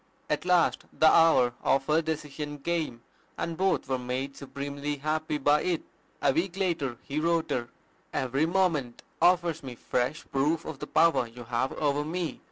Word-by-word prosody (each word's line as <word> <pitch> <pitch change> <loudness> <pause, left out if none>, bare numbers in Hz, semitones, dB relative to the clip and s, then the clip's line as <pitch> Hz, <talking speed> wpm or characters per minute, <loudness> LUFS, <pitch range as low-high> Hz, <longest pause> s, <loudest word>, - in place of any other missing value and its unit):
At 150 +2 0
last 180 -1 +3
the - - +2
hour 160 -7 +5
of 135 0 +2
her 155 +3 +3
decision 150 -2 -4
came; 150 -6 -2 0.3
and 170 - -3
both 190 -4 +1
were 130 -1 0
made 130 +2 -3
supremely 140 +1 -4
happy 155 +1 -1
by 145 +1 +3
it. 175 -3 -1 0.4
A - - +4
week 180 +2 -1
later 160 -10 -1
he 145 +2 -3
wrote 165 0 +1
her, 120 -1 -1 0.4
"Every 135 +4 0
moment 165 -9 0 0.2
offers 175 -2 +3
me 130 -4 -7
fresh 125 +6 -2
proof 145 +4 +1
of 160 -4 -6
the - - -6
power 165 -7 +3
you 120 +1 -11
have 120 +3 -1
over 145 -1 0
me. 165 +2 -3
150 Hz, 170 wpm, -28 LUFS, 135-165 Hz, 0.4 s, hour